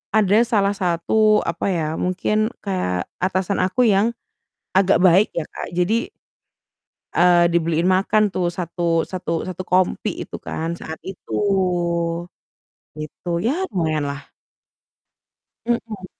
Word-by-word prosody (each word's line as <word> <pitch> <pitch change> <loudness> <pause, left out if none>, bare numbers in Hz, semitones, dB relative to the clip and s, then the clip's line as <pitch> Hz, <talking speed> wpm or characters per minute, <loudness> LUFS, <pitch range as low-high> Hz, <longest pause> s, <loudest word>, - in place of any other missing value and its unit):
ada 210 -1 +4
salah 205 -4 +2
satu, 205 +4 +2
apa 170 0 -3
ya, 165 -3 -1
mungkin 210 +4 0 0.2
kayak 135 - -2
atasan 190 +1 0
aku 190 +7 +1
yang 215 +3 +3 0.6
agak 190 -2 +4
baik 185 +4 +6
ya, 170 - -1
Kak. - - -6
Jadi 205 +7 +1 1.1
eee, 175 0 +5
dibeliin 170 0 +1
makan 200 +2 +2
tuh 180 -1 0
satu 170 -2 0
satu 170 -3 -3
satu 185 0 -5
kompi 185 0 +1
itu - - -9
kan, 165 +1 -4
saat 160 0 -7
itu, 190 -1 -9 1.7
gitu, 155 +3 -9
ya 295 - 0
lumayanlah. 150 -5 -2 1.3
Mhm. 230 -5 -3
185 Hz, 115 wpm, -21 LUFS, 170-205 Hz, 1.7 s, baik